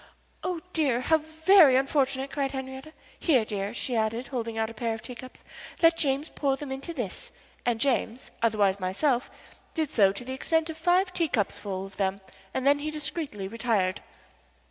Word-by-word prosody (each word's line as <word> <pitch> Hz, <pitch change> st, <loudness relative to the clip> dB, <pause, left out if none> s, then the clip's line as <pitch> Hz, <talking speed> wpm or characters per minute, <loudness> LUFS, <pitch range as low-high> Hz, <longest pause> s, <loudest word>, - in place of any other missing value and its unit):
"Oh, 360 Hz, -3 st, -2 dB
dear, 280 Hz, -7 st, +2 dB
how 320 Hz, +4 st, +3 dB
very 315 Hz, -1 st, +6 dB
unfortunate!" 270 Hz, 0 st, +1 dB
cried 275 Hz, -2 st, -1 dB
Henriette. 265 Hz, +2 st, -6 dB, 0.3 s
"Here, 260 Hz, -10 st, +3 dB
dear," 200 Hz, -1 st, -3 dB
she 240 Hz, +1 st, -2 dB
added, 225 Hz, +3 st, -1 dB
holding 230 Hz, -4 st, -3 dB
out 220 Hz, 0 st, +1 dB
a -, -, -10 dB
pair 230 Hz, 0 st, -2 dB
of 225 Hz, -, -11 dB
teacups. 250 Hz, +1 st, -9 dB, 0.4 s
"Let 330 Hz, 0 st, +7 dB
James 285 Hz, 0 st, 0 dB
pour 275 Hz, -2 st, 0 dB
them 285 Hz, -2 st, -7 dB
into 270 Hz, +6 st, -4 dB
this," 240 Hz, -, -4 dB, 0.4 s
and 235 Hz, -2 st, +2 dB
James, 250 Hz, -2 st, -1 dB
otherwise 205 Hz, -4 st, +2 dB
myself, 240 Hz, +8 st, 0 dB, 0.5 s
did 315 Hz, -3 st, -1 dB
so 195 Hz, -4 st, +5 dB
to 200 Hz, +5 st, -7 dB
the 260 Hz, -, -4 dB
extent 320 Hz, +4 st, 0 dB
of 315 Hz, -, -10 dB
five 360 Hz, +3 st, +3 dB
teacups 295 Hz, -, 0 dB
full 195 Hz, -2 st, -4 dB
of 195 Hz, 0 st, -13 dB
them 195 Hz, 0 st, 0 dB, 0.3 s
and 260 Hz, -, -2 dB
then 285 Hz, +1 st, +5 dB
he 305 Hz, +1 st, -3 dB
discreetly 300 Hz, -, -3 dB
retired. 215 Hz, -4 st, 0 dB
260 Hz, 175 wpm, -27 LUFS, 220-305 Hz, 0.5 s, Let